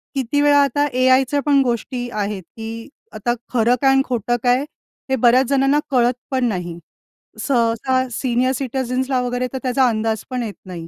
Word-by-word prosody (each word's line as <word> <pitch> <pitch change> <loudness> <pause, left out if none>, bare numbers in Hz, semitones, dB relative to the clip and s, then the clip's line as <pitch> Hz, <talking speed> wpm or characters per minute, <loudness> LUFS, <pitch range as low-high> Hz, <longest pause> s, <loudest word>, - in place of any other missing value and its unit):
किती 270 +2 0
वेळा 290 0 +4
आता 290 +2 +1
एआयच्या 260 +2 +3
पण 280 -2 +4
गोष्टी 245 0 -3
आहेत 205 -3 -3
की 225 +3 -7 0.2
आता 240 +3 -1 0.2
खरं 235 +1 +3
काय 270 - +4
आणि 270 0 +4
खोटं 240 -1 -1
काय 245 +1 +3 0.5
हे 265 - +2
बऱ्याच 250 +2 +4
जणांना 275 +2 +2
कळत 245 -1 +3 0.2
पण 260 -2 +1
नाही. 175 -5 -4 0.7
सहसा 255 +1 +1
सीनियर 250 +1 0
सिटिझन्सला 260 0 -2
वगैरे 245 0 -2
तर - - -2
त्याचा 255 0 +2
अंदाज 220 -1 -2
पण 250 -2 -2
येत 210 -3 -6
नाही. 170 -3 -8
250 Hz, 165 wpm, -20 LUFS, 230-265 Hz, 0.7 s, वेळा